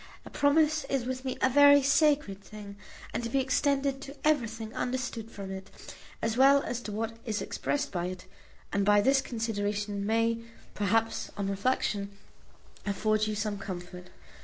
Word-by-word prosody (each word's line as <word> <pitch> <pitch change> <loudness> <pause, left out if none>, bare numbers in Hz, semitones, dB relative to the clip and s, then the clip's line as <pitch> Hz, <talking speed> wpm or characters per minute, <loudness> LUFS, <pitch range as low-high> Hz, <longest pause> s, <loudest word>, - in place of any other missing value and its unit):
A - - -10
promise 305 +1 +3
is 270 -3 -1
with 255 0 -4
me 260 -1 -3
a 260 - +5
very 285 +1 +7
sacred 280 -8 +2
thing, 205 -1 -10 0.4
and - - -1
to 230 - -3
be 270 - +1
extended 275 0 +1
to 275 +1 -9
everything 230 -6 0
understood 245 -3 -3
from 195 -3 -7
it, 190 0 -7 0.5
as 225 0 0
well 275 +2 +6
as 245 0 -3
to 215 - -6
what 225 +2 -3
is 220 -4 -2
expressed 290 0 -2
by 175 -1 -2
it; 185 0 -7 0.5
and 200 0 +1
this 210 +7 +5
consideration 205 -4 -2
may, 230 +2 +1 0.3
perhaps, 225 +3 0
on 200 -1 -2
reflection, 200 -1 0 0.7
afford 215 +2 +1
you 215 - -2
some 205 -1 -2
comfort. 180 -1 -7
225 Hz, 160 wpm, -29 LUFS, 205-270 Hz, 0.7 s, very